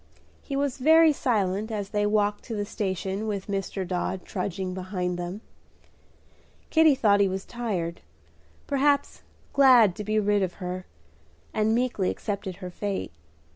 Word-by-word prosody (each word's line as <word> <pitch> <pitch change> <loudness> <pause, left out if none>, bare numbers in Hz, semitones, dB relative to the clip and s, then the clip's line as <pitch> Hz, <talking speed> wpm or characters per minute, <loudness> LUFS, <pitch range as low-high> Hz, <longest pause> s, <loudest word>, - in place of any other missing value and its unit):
He 275 - -5
was 275 -1 -1
very 320 +3 +6
silent 215 -4 0
as 205 -2 -3
they 205 -1 +1
walked 205 0 +1
to 230 - -5
the 205 -1 -2
station 195 +1 -3
with 200 -3 -3
Dr. 195 -1 -3
Dodd 180 +1 -3
trudging 185 -1 -3
behind 180 -1 -3
them. 175 +4 -5 1.3
Kitty 315 -3 +6
thought 205 -6 +3
he 200 - +4
was 190 0 -4
tired, 195 -9 -3 0.6
perhaps 285 0 +1 0.3
glad 250 -9 +6
to 210 - -4
be 215 +1 +1
rid 205 -1 +2
of 185 -2 -1
her, 180 -1 -6 0.7
and 220 +1 +2
meekly 240 -6 0
accepted 200 -3 -4
her 180 -1 -8
fate. 200 +1 -3
205 Hz, 145 wpm, -26 LUFS, 190-230 Hz, 1.3 s, very